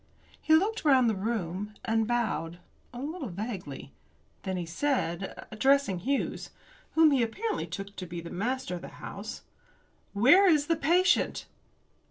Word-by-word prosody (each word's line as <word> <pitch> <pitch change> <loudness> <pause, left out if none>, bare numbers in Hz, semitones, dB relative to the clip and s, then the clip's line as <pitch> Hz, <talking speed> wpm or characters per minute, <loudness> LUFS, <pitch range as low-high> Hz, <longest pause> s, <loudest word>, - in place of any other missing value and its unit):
He 315 - +5
looked 410 +7 +1
round 265 -5 +5
the 220 - +1
room, 205 -1 -3
and 225 -1 +1
bowed 190 -9 -1 0.3
a 245 - -8
little 295 - -4
vaguely. 190 - -6 0.5
Then 190 -1 -3
he 175 - -3
said, 190 - -2
addressing 265 -3 +2
Hughes, 270 +9 -2 0.5
whom 320 -1 +6
he 270 -3 +3
apparently 415 - -2
took 200 +1 -7
to 185 - -5
be 170 +1 -6
the 170 0 -8
master 230 +1 -2
of 175 - -5
the - - -8
house, - - -7 0.7
"Where 290 - +6
is 300 -3 +4
the 330 - +2
patient?" 350 +5 +2
230 Hz, 150 wpm, -29 LUFS, 190-290 Hz, 0.7 s, whom